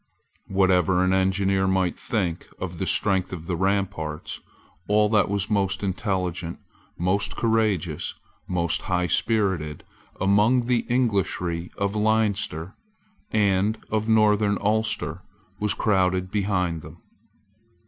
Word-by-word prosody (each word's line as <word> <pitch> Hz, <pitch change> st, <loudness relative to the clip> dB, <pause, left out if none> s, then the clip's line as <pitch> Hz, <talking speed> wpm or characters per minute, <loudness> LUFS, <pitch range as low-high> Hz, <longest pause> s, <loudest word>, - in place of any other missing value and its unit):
Whatever 95 Hz, -1 st, +3 dB
an 95 Hz, 0 st, +2 dB
engineer 95 Hz, 0 st, +2 dB
might 95 Hz, -2 st, +1 dB
think 95 Hz, -8 st, -2 dB
of 90 Hz, -3 st, -6 dB
the -, -, -1 dB
strength 95 Hz, -2 st, +1 dB
of 85 Hz, -3 st, -6 dB
the 85 Hz, -, -2 dB
ramparts, 95 Hz, -4 st, -2 dB, 0.5 s
all 105 Hz, 0 st, +3 dB
that 105 Hz, -4 st, +3 dB
was 100 Hz, 0 st, -1 dB
most 95 Hz, -2 st, 0 dB
intelligent, 90 Hz, -3 st, -2 dB, 0.4 s
most 95 Hz, +4 st, 0 dB
courageous, 105 Hz, -9 st, 0 dB, 0.3 s
most 85 Hz, -2 st, 0 dB
highspirited 90 Hz, -3 st, 0 dB, 0.4 s
among 105 Hz, +6 st, +4 dB
the 120 Hz, -1 st, 0 dB
Englishry 95 Hz, -8 st, 0 dB
of 100 Hz, +1 st, -1 dB
Leinster 105 Hz, -5 st, 0 dB, 0.6 s
and 100 Hz, +1 st, +2 dB
of 110 Hz, +1 st, 0 dB
Northern 105 Hz, -2 st, +4 dB
Ulster 110 Hz, -5 st, -1 dB, 0.4 s
was 105 Hz, 0 st, 0 dB
crowded 95 Hz, -3 st, +1 dB
behind 90 Hz, -5 st, 0 dB
them. -, -, -12 dB
95 Hz, 110 wpm, -24 LUFS, 90-105 Hz, 0.6 s, among